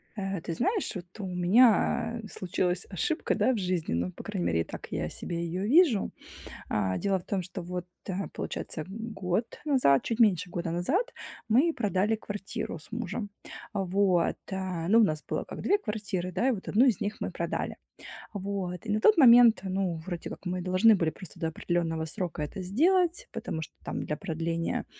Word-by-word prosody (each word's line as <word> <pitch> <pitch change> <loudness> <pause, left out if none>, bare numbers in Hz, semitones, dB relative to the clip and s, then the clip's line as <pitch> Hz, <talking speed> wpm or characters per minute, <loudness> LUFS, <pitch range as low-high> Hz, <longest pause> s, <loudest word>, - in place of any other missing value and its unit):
Э, 195 -4 -3
ты 165 - -4
знаешь, 395 - 0
вот 175 -2 -5
у 200 - -3
меня, 220 +5 +3
э, - - -7
случилась 180 -1 -2
ошибка, 200 - -1
да, 220 +4 +3
в - - -1
жизни. 180 - -1
Ну, 85 +2 -1
по - - -10
крайней 85 - -3
мере, 80 -1 +2
так - - -8
я - - -2
себе 170 - -5
ее 175 +3 -3
вижу. 275 - +4 0.6
А, 95 -3 0
дело 195 -1 +1
в - - -14
том, 195 -2 -1
что 180 +1 -7
вот, 180 0 -5 0.2
э, 190 - -2 0.2
получается, 155 - -4
год 210 -1 -2 0.2
назад, 255 - +4
чуть 230 0 -2
меньше 185 -7 +4
года 170 -1 -3
назад, 310 - 0 0.4
мы 280 +10 +4
продали 210 -3 +1
квартиру 205 -5 -5
с 155 - -18
мужем. 215 -2 -3 0.4
Вот, 190 -2 +2 0.2
а. 185 -3 -3
Ну, 225 +3 +6
у - - +7
нас 155 -6 0
было - - -1
как - - -7
2 405 - +3
квартиры, 205 - -3
да, 190 +8 +1
и - - +4
вот 205 -6 -5
1 235 +6 +4
из 240 -8 +3
них 205 +1 -2
мы - - -3
продали, - - -3 0.6
вот. 195 -3 -4
И 215 - -2
на 210 - +2
тот 425 - +5
момент, 240 -5 +8
ну, 190 -2 -1
вроде 175 -3 -5
как - - -9
мы 180 0 -2
должны 185 +5 +5
были 165 -4 +1
просто 185 -2 -12
до 165 - 0
определенного 165 -1 -1
срока 170 0 -4
это 150 +6 -5
сделать. 345 - +2
Потому 160 - -4
что 160 - -8
там - - -3
для 150 - -3
продления, 165 -2 -2
190 Hz, 190 wpm, -29 LUFS, 175-225 Hz, 0.6 s, момент